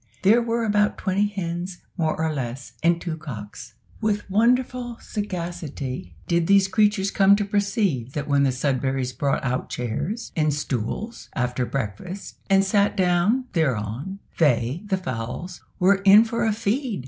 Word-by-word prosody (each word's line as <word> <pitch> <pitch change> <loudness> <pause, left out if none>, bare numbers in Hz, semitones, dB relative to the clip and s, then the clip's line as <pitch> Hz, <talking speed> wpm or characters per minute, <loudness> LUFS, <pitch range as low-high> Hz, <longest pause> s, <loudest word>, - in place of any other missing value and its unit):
There 220 +5 +6
were 230 0 -1
about 210 -1 +2
twenty 200 +1 +1
hens, 175 -2 -4 0.2
more 160 -3 -1
or 160 -1 0
less, 130 -1 -5
and 170 +1 +3
two 170 -2 -4
cocks. 115 -5 -8 0.3
With 210 -2 0
wonderful 245 +2 +1
sagacity 170 - -5
did 170 -1 +1
these 195 -1 +5
creatures 200 0 +2
come 195 0 +5
to 205 0 -1
perceive 200 - 0
that 145 - -3
when 140 -1 +3
the 140 - +4
Sudberrys 130 -1 -1
brought 140 -1 0
out 125 -1 -2
chairs 145 - -3
and 155 -2 +2
stools 150 - -4
after 125 -1 -1
breakfast, 135 - -5
and 195 0 +5
sat 200 +1 +2
down 185 +7 +2
thereon, 140 - -1 0.2
they, 130 0 +2
the 195 -2 +1
fowls, 130 +2 -5 0.2
were 195 +1 +4
in 200 +3 +8
for 230 0 -1
a - - +3
feed! 230 +2 -1
175 Hz, 150 wpm, -24 LUFS, 135-205 Hz, 0.3 s, in